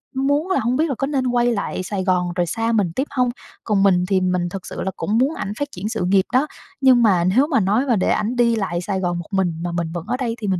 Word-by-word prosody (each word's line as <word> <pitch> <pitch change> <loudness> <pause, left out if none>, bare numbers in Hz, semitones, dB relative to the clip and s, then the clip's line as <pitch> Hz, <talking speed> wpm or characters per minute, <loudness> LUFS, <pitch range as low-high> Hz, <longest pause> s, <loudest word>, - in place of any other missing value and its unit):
muốn 285 +6 0
là - - +2
hông 240 +3 0
biết 315 +3 +1
là 270 - -1
có 275 - -2
nên 270 -3 0
quay 245 -1 +2
lại 200 -2 -3
Sài 190 0 -3
Gòn 180 -2 0
rồi 175 -1 +1
xa 225 +6 -1
mình 205 -6 +1
tiếp 270 +3 -1
hông. 250 -3 +1 0.3
Còn 205 -3 +1
mình 180 -2 +3
thì 190 -2 +2
mình 180 -1 0
thực 190 0 -7
sự - - -6
là 190 - -2
cũng 215 +2 0
muốn 275 +6 +2
ảnh 200 - -4
phát 285 - -1
triển 200 +4 -5
sự 220 -6 -2
nghiệp 190 0 +3
đó, 265 +4 +3 0.3
nhưng 255 -3 +5
mà 185 -5 +4
nếu 235 +11 +3
mà 275 -7 +2
nói 210 +7 +1
mà 240 -4 +2
để 185 - 0
ảnh 235 +4 0
đi 235 -1 +3
lại 175 -5 -2
Sài 190 0 -2
Gòn 175 -2 -1
một 170 - -8
mình 190 -3 +1
mà 175 - -2
mình 170 -1 -2
vẫn 175 -1 -5
ở 250 +1 -1
đây 235 -3 -2
thì 210 - -3
mình 185 -2 0
210 Hz, 295 wpm, -21 LUFS, 185-250 Hz, 0.3 s, nhưng